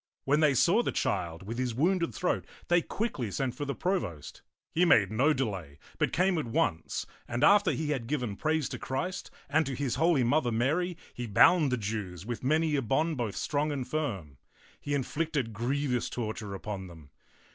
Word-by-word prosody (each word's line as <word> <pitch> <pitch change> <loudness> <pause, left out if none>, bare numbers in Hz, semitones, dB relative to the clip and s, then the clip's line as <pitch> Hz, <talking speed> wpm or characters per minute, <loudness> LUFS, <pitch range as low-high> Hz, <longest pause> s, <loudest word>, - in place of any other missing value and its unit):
When 145 +2 +2
they 150 -3 +4
saw 185 - +4
the - - -1
child 85 -3 -2
with 115 +5 -5
his 125 -3 -1
wounded 170 +5 +2
throat, 180 - -1 0.2
they 175 0 +5
quickly 165 - -3
sent 130 +5 -2
for 145 - -4
the 140 - -3
provost. 85 - -3 0.3
He 170 - +2
made 105 - +5
no 130 +8 +3
delay, 95 - -3 0.2
but - - +2
came 180 -1 +2
at 150 - -3
once, 115 - -1 0.2
and 120 +1 -2
after 200 -1 +6
he 150 +1 -1
had 125 -6 -2
given 125 -7 -2
praise 155 +5 0
to - - -6
Christ 180 +8 -3 0.2
and 155 +3 +3
to 135 - -3
his 130 -3 -2
holy 165 -6 +4
Mother, 125 +1 +2
Mary, 155 +10 0 0.2
he 120 -1 -5
bound 145 - +5
the 125 - +1
Jews 100 -5 -4
with 120 +1 -5
many 155 +3 +2
a 140 - +1
bond 150 +7 +1
both 115 -5 -2
strong 150 +1 -1
and 135 -4 -3
firm. 100 - -3 0.4
He 145 0 -2
inflicted 140 -3 -1
griev 130 +5 -1
ous 120 - -1
torture 110 -3 -4
upon 95 -1 -5
them. 80 -5 -14
135 Hz, 190 wpm, -29 LUFS, 110-155 Hz, 0.4 s, after